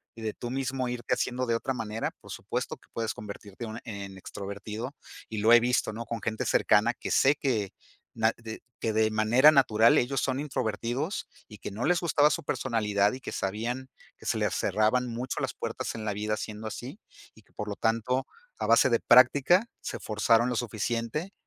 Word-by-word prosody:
y 115 - -10
de 110 -1 -2
tú 120 - -6
mismo 130 -1 -2
irte 120 -1 -2
haciendo 125 0 -2
de 115 - +2
otra 135 +3 -2
manera, 115 -2 -3
por - - -15
supuesto - - -4
que - - -26
puedes 115 -1 -2
convertirte 105 +1 -8
una 110 +1 -7
en 100 -3 -7
extrovertido, 105 +7 -6 0.3
y 110 - -4
lo 110 +3 +4
he 120 - +9
visto, 125 -1 +1
¿no? 115 +2 -6
Con 115 -2 -5
gente 110 0 -2
cercana - - +3
que - - -7
sé 140 +2 +5
que 115 -9 -1 0.4
nat 110 0 +1
de 115 -1 -8 0.2
que 110 -1 -1
de 110 0 +3
manera 110 +7 +5
natural 115 -6 +5
ellos 130 +2 +1
son 130 0 -1
introvertidos 130 - -2 0.2
y 105 - -12
que 105 - -7
no 110 +5 -3
les 175 0 +3
gustaba 150 -3 +3
su - - -2
personalidad 105 -7 +1
y 130 - -7
que - - -6
sabían 115 +7 -3 0.3
que - - -11
se - - +1
les - - 0
cerraban 125 +4 +1
mucho 120 +2 -4
las - - -2
puertas - - -4
en 110 -1 -5
la 105 - -1
vida 105 +1 -2
siendo 110 +1 -6
así, 130 - -7 0.3
y 110 - -19
que - - -32
por 105 - -5
lo 100 - -3
tanto, 115 +4 0 0.3
a - - -1
base 120 +2 +5
de 115 - +3
práctica, 135 - +5 0.2
se - - -4
forzaron 115 +2 +2
lo 125 - -1
suficiente 115 - -2
115 Hz, 200 wpm, -28 LUFS, 110-130 Hz, 0.4 s, he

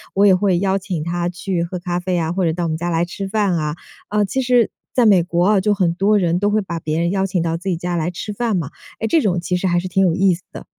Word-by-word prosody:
我 200 +1 +4
也 195 - +7
会 185 -1 +2
邀 195 0 +1
请 180 -4 -4
他 175 +1 -2
去 180 -1 -2
喝 170 +2 -4
咖 175 0 -2
啡 180 0 -2
呀， 165 -2 0
或 185 +2 -1
者 160 - +1
到 175 +1 -3
我 165 - -1
们 160 - -1
家 175 +2 -3
来 170 0 +1
吃 195 +2 -6
饭 205 -2 +1
啊。 150 -2 -2 0.3
呃， 210 0 +1
其 265 +7 -1
实 245 -2 +3 0.2
在 245 - +3
美 195 -5 +5
国 175 +1 +1
哦， 195 - +3
就 210 +2 +2
很 185 -4 +1
多 200 +4 +2
人 175 -2 +1
都 205 +1 +1
会 215 +1 +2
把 175 -4 -5
别 155 +1 -1
人 170 0 +1
邀 195 0 +1
请 185 -2 -1
到 165 0 -1
自 180 +4 -4
己 175 - 0
家 175 +1 -3
来 170 +1 -1
吃 210 +4 -6
饭 225 -2 -1
嘛。 160 -5 -3 0.3
哎， 225 - -1
这 325 +6 +3
种 180 -7 +1
其 180 +1 -2
实 180 - -2
还 175 -1 +2
是 180 - -4
挺 190 +1 +2
有 175 - +2
意 190 +1 +3
思 175 +2 -8
的。 - - -9
180 Hz, 330 characters per minute, -19 LUFS, 170-195 Hz, 0.3 s, 也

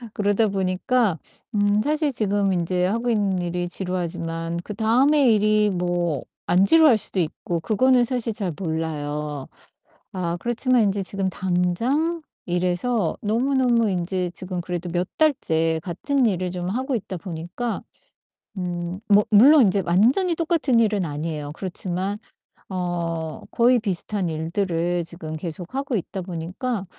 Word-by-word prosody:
그러다 205 +2 +2
보니까 195 +1 0 0.4
음 205 0 +3
사실 300 0 +1
지금 205 -3 +1
인제 180 +1 0
하고 230 +5 -1
있는 200 -4 +1
일이 175 0 -2
지루하지만 170 -2 -2
그다음에 250 +7 +3
일이 215 0 +3
뭐 175 -5 -1 0.3
안 185 +2 +5
지루할 310 -1 +6
수도 195 - -1
있고 170 +1 -3
그거는 250 +7 +3
사실 235 -2 -1
잘 200 -4 -2
몰라요. 150 -4 -3 0.7
아 175 -2 -2
그렇지만 240 +1 +2
인제 200 -1 0
지금 190 0 -2
당장 190 - 0 0.2
이래서 180 +3 0
너무너무 240 0 +2
인제 180 -1 -1
지금 185 -1 -5
그래도 175 0 -4
몇 175 +1 -1
달째 165 - +2
같은 260 - 0
일을 185 -4 0
좀 180 -1 -4
하고 260 +6 -1
있다 205 -4 -4
보니까 175 +7 -5 0.8
음 175 0 -4
뭐 205 0 +6
물론 270 +8 +8
인제 195 -1 +2
완전히 250 - +3
똑같은 320 -7 +1
일은 210 -5 +1
아니에요. 150 -1 -4
그렇지만 190 +1 -3 0.5
어 170 -3 -3
거의 245 +1 +4
비슷한 195 -2 -2
일들을 170 +1 -1
지금 165 -2 -7
계속하고 190 - -4
있다 190 +1 -5
보니까 185 +6 -4
190 Hz, 290 characters per minute, -23 LUFS, 175-230 Hz, 0.8 s, 물론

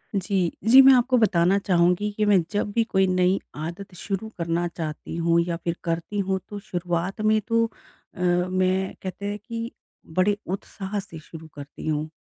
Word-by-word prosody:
जी। 190 -2 0 0.2
जी 260 +3 +10
मैं 270 0 +8
आपको 255 0 +3
बताना 195 -4 +3
चाहूँगी 180 +2 +2
कि 215 - +2
मैं 200 -3 +5
जब 205 0 -1
भी 230 - +3
कोई 190 -4 +2
नई 185 +1 +2 0.2
आदत 170 +5 -6
शुरू 195 +4 -4
करना 170 0 -1
चाहती 160 -2 -6
हूँ 170 0 +2
या 170 - -1
फिर 170 0 -1
करती 170 +4 -2
हूँ 190 -1 0
तो 205 - -6
शुरुआत 180 +1 -3
में 215 0 +3
तो 230 -1 +3
अ, 225 -4 -16
मैं 185 +1 +1
कहते 190 +2 -5
हैं 205 0 -2
कि 230 0 -5 0.5
बड़े 200 +2 +3
उत्साह 195 +2 -4
से 195 -5 -9
शुरू 160 +1 -11
करती 145 +1 -9
हूँ। 155 0 -1
185 Hz, 175 wpm, -24 LUFS, 170-205 Hz, 0.5 s, जी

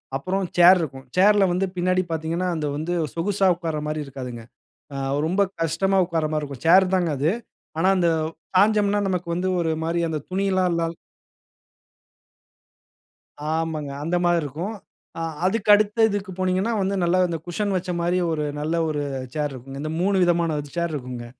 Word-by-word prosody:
அப்புறம் 185 +7 -1
சேர் 180 +2 +8
இருக்கும். 135 -4 -6
சேர்ல 205 +1 +5
வந்து 185 +2 +1
பின்னாடி 185 +1 +1
பார்த்தீங்கன்னா 165 +3 -2
அது 150 -2 -2
வந்து 165 +3 -2 0.2
சொகுசா 195 +3 0
உட்கார்ற 165 -3 -3
மாதிரி 150 0 -2
இருக்காதுங்க. 125 -4 -7 0.5
ஆ - - -3 0.3
ரொம்ப 190 +4 +1 0.2
கஷ்டமா 190 +5 +1
உட்கார்ற 165 -3 -1
மாரி 155 - 0
இருக்கும். 140 -3 -9
சேர்தாங்க 185 -1 +5
அது. 150 +6 +2 0.5
ஆனா 185 +3 +2
அந்த 170 -2 +3 0.5
சாய்ஞ்சோம்ன்னா 205 +1 +3
நமக்கு 180 -2 -2
வந்து 185 +1 -1
ஒரு 165 -1 0
மாரி 170 +1 0
அந்த 155 - -2
துணில்லாம் 185 -2 +1
இல்லாம. 165 0 -2 2.6
ஆமாங்க 160 -3 -2
அந்த 170 +3 -1
மாரி 175 -1 +3
இருக்கும். 170 +10 -4 0.7
அதுக்கு 210 +2 0
அடுத்து 210 +2 +3
இதுக்கு 200 -1 -3
போனீங்கன்னா 185 +5 +1
வந்து 195 +1 0 0.3
இந்த 165 -2 -3
குஷன் 200 +3 -1
வச்ச 180 0 -4
மாரி 175 +2 +1
ஒரு 150 -1 -1
நல்ல 155 +3 -1
ஒரு 145 -1 -2 0.3
சேர் 150 -2 -1
இருக்கும்ங்க. 135 +2 -8
இந்த 155 +1 -3
மூணு 195 +1 +2
விதமான 170 -3 +1 0.2
சேர் 170 -2 -1
இருக்கும்ங்க. 125 -3 -6
170 Hz, 150 wpm, -23 LUFS, 155-190 Hz, 2.6 s, சேர்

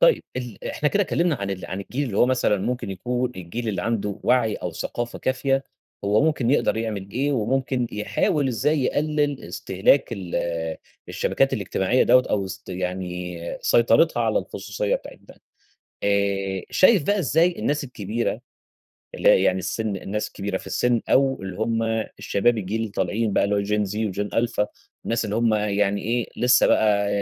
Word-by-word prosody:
طيب - - +5
ال 125 -5 -6
إحنا 150 - 0
كده 200 +6 +2
كلمنا 175 -3 +1 0.3
عن 95 - -5
الجيل 130 +8 -3
اللي 105 -6 -4
هو - - +6
مثلًا 120 -5 +2
ممكن 120 0 -3
يكون 125 +6 -2
الجيل 95 +7 -5
اللي 95 -4 -2
عنده 105 -2 -2
وعي 115 -4 +2
أو 90 - -5
ثقافة 120 +8 -4
كافية، 135 +1 0 0.4
هو 105 +2 +3
ممكن 145 -6 +1
يقدر 135 -6 +2
يعمل 105 -4 -3
إيه 140 +6 0
وممكن 130 +1 0
يحاول 135 +6 0
إزاي 145 +5 +1
يقلل 145 0 0
استهلاك 95 +9 +1
ال 95 -6 -6 0.7
الشبكات - - +1
الاجتماعية 95 +7 +1
دَوّة 125 0 +5
أو 100 -2 0
سط 95 - -9
يعني 90 -1 -4 0.2
سيطرتها 120 +3 +3
على 110 -1 +2
الخصوصية 100 +1 -3
بتاعة - - -11
ده. - - -17 0.6
آآ، 100 -2 0
شايف 185 -2 +5
بقى 205 +7 +1
إزاي 170 +2 +2
الناس 145 0 0
الكبيرة، 115 -2 -3 0.8
اللي - - +3
هي 95 - +5
يعني 95 -1 +2
السن 110 +2 -2
الناس 100 +3 -4
كبيرة 100 -1 -3
في - - -11
السن 120 -1 +1
أو 135 -3 +3
اللي 95 -1 -6
هم 115 +1 0 0.4
الشباب 120 +4 +1
الجيل 105 +2 -2
اللي 110 -2 -3
طالعين 100 +3 -1
بقى - - +3
اللي 100 +1 +1
هو 100 - +1
gen 105 +1 0
Z، - - -4 0.2
وgen 105 0 -2
alpha، 115 -3 0 0.4
الناس 115 0 0
اللي 105 0 -2
هم 115 -1 +2
يعني 100 -1 +1
إيه، 120 +1 -1
لسه 125 0 +5
بقى 100 -2 +3
110 Hz, 170 wpm, -24 LUFS, 100-125 Hz, 0.8 s, هو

